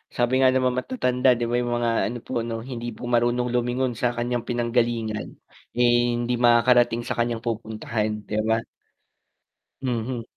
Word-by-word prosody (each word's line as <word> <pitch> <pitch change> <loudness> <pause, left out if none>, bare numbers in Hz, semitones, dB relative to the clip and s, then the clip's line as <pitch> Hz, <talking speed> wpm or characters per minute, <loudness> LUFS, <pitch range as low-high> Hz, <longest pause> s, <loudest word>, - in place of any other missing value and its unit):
Sabi 120 +1 +1
nga 130 -1 +6
ng 130 - +2
mga 125 0 +1
matatanda, 125 - 0
'di 120 - -1
ba? 120 - 0
Yung 120 0 -2
mga 120 -1 +1 0.2
ano 120 +2 -4
po - - -11
ano, 115 -1 -4
"Hindi 120 -2 -5
po - - -12
marunong 120 +1 +1
lumingon 125 +1 0
sa 120 +1 0
kanyang 120 0 -1
pinanggalingan, 120 -2 -1 0.5
eh, 120 0 +4 0.3
hindi 120 +1 -1
makakarating 120 0 +4
sa - - -3
kanyang 115 -1 -1
pupuntahan", 110 -2 -3
'di 105 - -2
ba? 115 0 +2 1.2
Mhm. 120 -1 -2
120 Hz, 160 wpm, -24 LUFS, 115-125 Hz, 1.2 s, nga